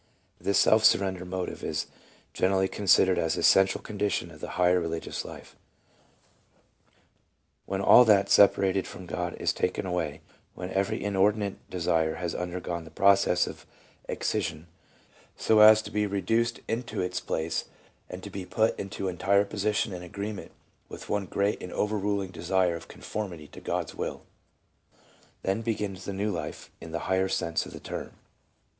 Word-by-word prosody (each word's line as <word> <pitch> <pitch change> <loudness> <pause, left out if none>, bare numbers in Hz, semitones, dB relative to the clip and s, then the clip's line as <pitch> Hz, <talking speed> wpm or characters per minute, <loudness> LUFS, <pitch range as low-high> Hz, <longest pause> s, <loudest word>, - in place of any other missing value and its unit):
This 100 - +1
self 110 0 +5
surrender 95 -3 +3
motive 90 0 -4
is - - -2 0.5
generally 95 0 +2
con 100 +1 -6
sidered 95 0 +5
an 80 - 0
essential 95 0 +4
condition 100 -4 -2
of 80 - -13
the - - -6
higher 90 0 +4
religious 85 -1 -4
life: - - -11 0.9
— - - -39
When 95 0 -2
all 125 - +8
that 100 -3 +5
separated 95 -1 +4
from 95 - -9
God 90 0 -3
is - - +1
taken - - -1
away, 90 -5 -2 0.3
when 90 +1 -6
every 95 0 -1
inordinate 100 0 0
desire 80 -3 0
has 85 -2 -3
undergone 90 -1 -4
the 80 - -12
process 95 +1 +4
of - - -9 0.4
excision, 75 +2 -2 0.7
so 110 -1 +3
as 110 0 +8
to - - -8
be 105 0 0
reduced 115 +4 0
into 115 +1 -3
its 90 0 -2
place, 80 -2 -2 0.4
and 90 +1 -8
to 100 - -8
be 95 0 -5
put 110 +4 0
into 95 0 -4
entire 100 +3 +2
position 105 0 -1
and 90 -1 -6
agree 100 +4 -5
ment 100 - -9 0.4
with - - -10
one 100 -2 -1
great 100 +3 0
and 90 - -7
overruling 100 -2 -1
desire 90 0 +1
of 80 - -9
conformity 90 -8 -6
to - - -12
God's - - -3
will, - - -5 1.2
then 95 +4 0
begins 105 -4 -3
the - - -3
new 100 +2 -1
life 80 -5 -6
in 80 - -9
the 85 - -3
higher 95 0 +1
sense 85 -3 -1
of - - -10
the - - -9
term. - - -6
95 Hz, 160 wpm, -28 LUFS, 90-100 Hz, 1.2 s, all